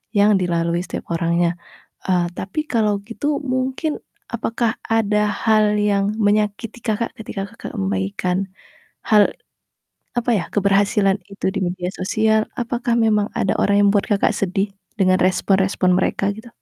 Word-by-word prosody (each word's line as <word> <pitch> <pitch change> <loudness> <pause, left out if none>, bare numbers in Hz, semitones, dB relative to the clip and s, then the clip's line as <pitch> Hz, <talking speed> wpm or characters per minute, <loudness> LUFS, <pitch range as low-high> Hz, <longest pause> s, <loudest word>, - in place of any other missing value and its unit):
yang 205 -1 +5
dilalui 170 -1 0
setiap 170 - -7
orangnya. 170 +1 +1 0.5
Eee, 180 -2 +2
tapi 195 +12 -3
kalau 210 -4 +1
gitu 285 +7 -2
mungkin 260 +4 -1 0.3
apakah 230 0 -1
ada 210 -2 +2
hal 215 0 +2
yang 205 0 +1
menyakiti 210 +2 0
Kakak 225 0 -2
ketika 200 -2 -5
kakak 230 - -9
membagikan, 100 - -1 0.6
hal, 210 -2 +4 0.8
apa 240 0 0
ya, 180 - 0
keberhasilan 200 0 +2
itu 200 -1 -3
di 200 - -3
media 180 0 -2
sosial? 220 +3 +1
Apakah 240 0 -1
memang 215 -3 +2
ada 220 -5 +1
orang 200 - +3
yang - - +5
membuat 205 -1 +1
Kakak - - +2
sedih 195 +1 -1 0.2
dengan 185 -2 +3
respon-respon 190 0 +2
mereka 195 +1 +1
gitu? 220 +3 -10
205 Hz, 135 wpm, -20 LUFS, 185-220 Hz, 0.8 s, yang